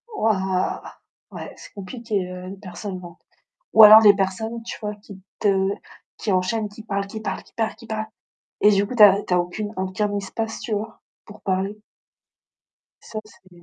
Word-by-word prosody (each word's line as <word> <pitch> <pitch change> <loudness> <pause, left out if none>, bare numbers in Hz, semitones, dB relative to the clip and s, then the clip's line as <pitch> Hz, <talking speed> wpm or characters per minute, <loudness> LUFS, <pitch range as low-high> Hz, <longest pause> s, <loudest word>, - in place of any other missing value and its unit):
wouah. 190 -4 0 0.5
Ouais, - - -8
c'est - - -13
compliqué, 205 -2 -4
heu, 180 0 -8
une 195 +1 -9
personne 185 0 -7
lente. 175 0 -12 0.5
Ou 220 - +9
alors 215 +1 +11
les 205 -2 +7
personnes, 220 +4 -2
tu - - -6
vois, 210 0 -4
qui 200 -2 -13 0.2
te 195 -2 +2 0.5
qui 210 - -2
enchaînent, 210 +3 0
qui 215 +1 -12
parlent, 200 -2 -2
qui 220 +2 -7
parlent, - - -4
qui - - -24
parlent, 225 -1 -2
qui 230 - -15
parlent. 220 -1 -3 0.5
Et 210 - +6
du 200 0 +2
coup, 250 - -6
tu 215 - +6
as 200 0 +8
tu 180 - -1
as - - +4
aucune 205 +4 -4
aucun 190 +2 -2
espace, 225 +3 -4
tu 225 - -5
vois, 215 +2 -5 0.3
pour 210 0 -13
parler. 195 +2 -2 1.2
Ça, 215 - -6
c'est 190 -3 -20
205 Hz, 185 wpm, -23 LUFS, 190-220 Hz, 1.2 s, alors